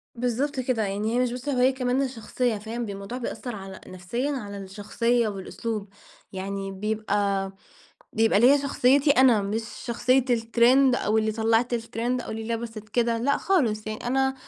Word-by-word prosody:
بالضبط 250 +4 -1
كده، 245 -3 0
يعني 205 +3 -2
هي - - +2
مش 250 -1 +1
بس 250 +3 -5
هويّة 255 -1 +3
كمان 255 -1 -1
ده 275 - +1
شخصية، 245 -1 -2
فاهم؟ 225 +3 -5
ب - - -7
الموضوع 200 +4 -6
بيأثر 245 -1 -5
على 195 -1 -9
نفسيًا 185 +10 -3
على 205 -8 -5
الشخصية 215 +5 -1
والأسلوب، 210 +1 -5 0.4
يعني 195 0 -4
بيبقى، 200 -1 -1 0.6
بيبقى 225 -2 +3
ليَّ 265 +5 +6
شخصيتي 280 +1 +3
أنا، 255 -6 +5
مش 210 +3 -2 0.2
شخصية 250 +2 +2
الترند 240 +3 +4
أو 215 -1 +1
اللي 220 0 +1
طلّعت 225 +2 +1
الترند 235 +1 -2
أو - - -8
اللي 220 0 -5
لبست 225 -2 -7
كده، 235 +1 +1
لأ 275 +5 +1
خالص، 235 - +1
يعني 215 +2 -5
أنا 265 +1 +1
230 Hz, 165 wpm, -25 LUFS, 210-250 Hz, 0.6 s, ليَّ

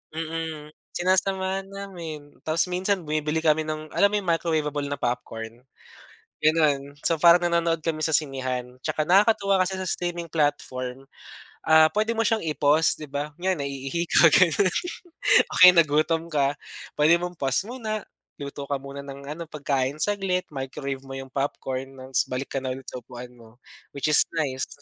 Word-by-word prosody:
Mm, 160 -2 -5 0.2
sinasamahan 190 +1 0
namin. 170 -7 -8 0.2
Tapos 160 +1 +2
minsan 185 0 0
bumibili 155 +1 -1
kami 155 0 +2
ng 155 0 -5
alam 200 - +4
mo 210 - -3
yung 195 -4 -1
microwaveable 150 -4 -1
na 145 - -2
popcorn, 120 -1 -5 0.8
ganun. 145 -3 +2
So, 165 - +1
parang 175 +2 +5
nanonood 170 -1 +1
kami 155 -1 -2
sa 160 - 0
sinehan. 130 -4 -1
Tsaka 155 -1 -1
nakakatuwa 200 +1 +4
kasi 190 0 -4
sa 185 - -3
streaming 175 -1 -3
platform, 135 -4 -2 0.6
ah, 160 0 +6
pwede 215 +2 0
mo 225 - +1
siyang 220 -5 0
i-pause, 150 +1 +3
'di 150 - -9
ba, 145 +1 -4
yan 185 -2 +1
naiihi 140 +4 -3
ka 165 -1 +6
ganun, 185 +1 +4 0.8
o - - -7
kaya 180 - +12
nagutom 160 0 +3
ka, 145 -3 +1 0.5
pwede 155 +3 +6
mong 180 -1 -6
pause 135 +6 0
muna, 215 -5 -4 0.3
luto 140 -1 -7
ka 140 - -1
muna 140 +1 -7
ng 140 0 -8
ano 170 +2 -5
pagkain 140 -3 -1
saglit. 195 -3 0
Microwave 135 0 -5
mo 135 - -7
yung 135 -1 -8
popcorn 135 -1 -3
ng 130 0 -11
s 130 - +2
balik 130 +2 -4
ka 135 - -1
na 130 -1 -3
ulit 135 - -10
sa 125 - -6
upuan 125 +1 -10
mo, 115 -2 -18 0.4
which 140 +2 0
is 150 - +5
nice. 135 -5 -1
155 Hz, 165 wpm, -25 LUFS, 135-175 Hz, 0.8 s, kaya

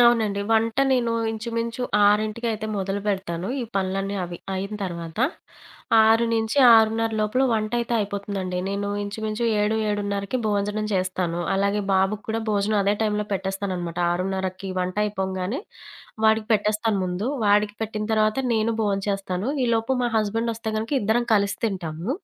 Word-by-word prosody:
అవునండి. 225 -4 +4
వంట 225 0 +2 0.2
నేను 235 -2 +1 0.2
ఇంచుమించు 230 +2 -3 0.2
ఆరింటికైతే 215 +1 +1
మొదలుబెడతాను. 195 -2 -2
ఈ - - -2
పనులన్నీ 195 +1 -1
అవి 175 0 -7 0.2
అయిన 195 +3 -3
తర్వాత. 170 -1 -6 0.9
6:00-6:30 225 0 +4
లోపల 215 +5 +1
వంటయితే 230 +2 -1
అయిపోతుందండి. 200 -2 -3
నేను 200 0 -2
ఇంచుమించు 215 +2 -3 0.2
7:00-7:30 205 0 -1
భోజనం 210 +1 0
చేస్తాను. 185 -2 -1 0.2
అలాగే 200 +1 +1
బాబుకి 195 +2 +1
కూడా 225 +1 -1
భోజనం 210 +1 +1
అదే 200 +1 +2
టైంలో 210 -1 0
పెట్టేస్తాననమాట. 190 -3 -3
6:30కి 190 +1 -3
వంటయిపోంగానే 190 +2 -1 0.7
వాడికి 220 0 +4
పెట్టేస్తాను 215 +1 +1
ముందు. 180 +4 -2 0.2
వాడికి 205 0 +3
పెట్టిన 215 -1 -3
తర్వాత 215 +2 +2
నేను 225 0 +1
భోం 200 -2 +1
చేస్తాను. 195 0 -2 0.2
ఈలోపు 230 +1 +1
మా 240 - +2
హస్బెండొస్తే 225 +1 -1
గనక 220 +1 -3
ఇద్దరం 220 +4 +1
కలిసి 200 -1 +1
తింటాము. 180 -2 -3
210 Hz, 120 wpm, -24 LUFS, 195-220 Hz, 0.9 s, అవునండి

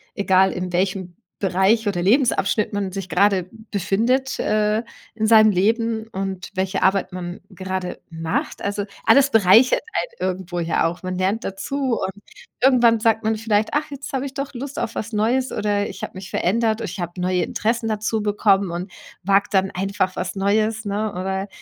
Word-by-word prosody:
egal 190 -1 +3
in 180 0 -4
welchem 185 -1 -1 0.2
Bereich 195 +4 +2
oder 175 -4 0
Lebensabschnitt 215 -2 +2
man 200 -2 -2
sich 190 -1 -6
grade 190 -1 +2 0.2
befindet, 235 +7 0
äh, 215 +1 +1 0.3
in 220 -1 0
seinem 215 -1 +7
Leben 220 +3 0
und 195 -3 -5
welche 190 0 -1
Arbeit 190 -1 +2
man 175 -1 -6
grade 185 0 -4
macht, 165 0 -3
also, 205 0 -2 0.2
alles 280 0 +6
bereichert 225 - +5 0.4
einen - - 0
irgendwo 180 -1 -6
ja 165 -1 +1
auch. 175 +2 -6
Man 185 0 -3
lernt 195 +5 0
dazu 260 +6 -2
und 190 - -2 0.5
irgendwann 240 -3 +5
sagt 225 0 +2
man 220 0 +1
vielleicht: 215 -1 +1
„Ach, 300 +1 0
jetzt 280 +1 -7
habe 265 0 -1
ich 270 - -11
doch 275 0 -4
Lust 275 +3 -6
auf 220 - -3
was 220 +2 -4
Neues 240 +5 +1
oder 205 -1 -1
ich 190 - -9
habe - - -5
mich 185 0 -8
verändert, 220 +3 +1
o - - -3
ich 185 -1 -6
habe 175 +1 -5
neue 180 0 +1
Interessen 230 +1 -1
dazu 215 +1 -1
bekommen 200 -2 +2
und 180 +3 -5 0.3
wage 195 +2 +3
dann 190 -1 +2
einfach 190 0 -1
was 185 +1 -3
Neues, 215 +3 +1
ne?“ 205 +1 -1
Oder 190 +2 -3
200 Hz, 180 wpm, -22 LUFS, 185-225 Hz, 0.5 s, seinem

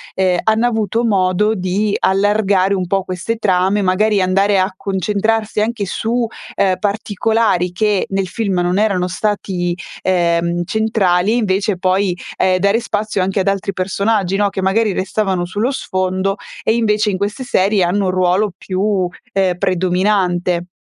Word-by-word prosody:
ehm, 185 -2 +2
hanno 220 +2 +2
avuto 225 -1 0
modo 200 0 +2
di 200 +2 -1
allargare 200 -1 +2
un 185 -2 -1
po' 195 +1 0
queste 185 +5 -3
trame, 195 -1 +1
magari 205 +3 +2
andare 195 +2 +2
a 185 +1 +1
concentrarsi 210 +3 -1
anche 220 -1 -1
su, 230 +5 -1 0.3
ehm, 190 -2 +2
particolari 205 -2 0
che 205 +1 0
nel 195 -1 -1
film 195 -2 -1
non 175 +2 +1
erano 195 -4 +1
stati, 185 -2 -2 0.3
ehm, 170 -1 +1
centrali 215 -2 +1
invece 200 -3 0
poi, 185 0 +1 0.2
ehm, 185 -1 +2
dare 200 +4 +2
spazio 215 -3 -2
anche 190 +2 0
ad 190 - -3
altri 195 0 0
personaggi, 195 +1 0
no, 205 0 +2
che 190 -1 -4
magari 210 +2 +2
restavano 190 -2 -1
sullo 205 +7 -1
sfondo 185 -5 -1 0.3
e - - +2
invece 215 -2 +1
in 205 -3 0
queste 205 +6 -3
serie 200 -5 +2
hanno 195 +3 +1
un 185 - +1
ruolo 185 +3 +1
più, 190 -1 -1 0.2
ehm, 185 -2 +1
predominante. 180 -1 0
195 Hz, 150 wpm, -17 LUFS, 185-210 Hz, 0.3 s, ehm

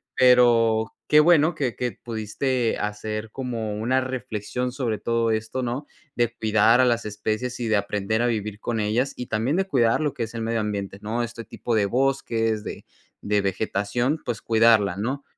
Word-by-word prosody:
Pero 120 -3 +4
qué 150 0 +6
bueno 165 0 +4
que 125 -5 -2
que 125 -1 -2
pudiste 115 +2 -2
hacer 105 +1 -4
como 115 -5 -4
una 130 +4 +1
reflexión 125 -1 -4
sobre 120 -6 -2
todo 115 +1 0
esto, 110 +4 -2
¿no? 125 +4 -3 0.3
De 120 -1 0
cuidar 110 +3 +4
a - - +5
las 115 -2 +1
especies 110 +4 -3
y 115 - -1
de 110 - +3
aprender 105 +2 -1
a 120 - +2
vivir 105 -3 -2
con 115 -1 -2
ellas, 115 +6 0
y 125 - -6
también 115 +8 0
de 190 - +1
cuidar 120 -6 +2
lo 150 -2 0
que 120 - -3
es 115 - -6
el 115 - -4
medio 115 0 -1
ambiente, 100 -2 -3
¿no? 115 +3 -2
Este 115 0 -7
tipo 120 - -4
de 105 -2 +3
bosques, 115 -3 0
de - - -7 0.4
de 105 0 +1
vegetación, 105 - -1
pues, 120 -2 -3
cuidarla, 110 -4 +4
¿no? 135 +7 -3
115 Hz, 185 wpm, -24 LUFS, 110-125 Hz, 0.4 s, qué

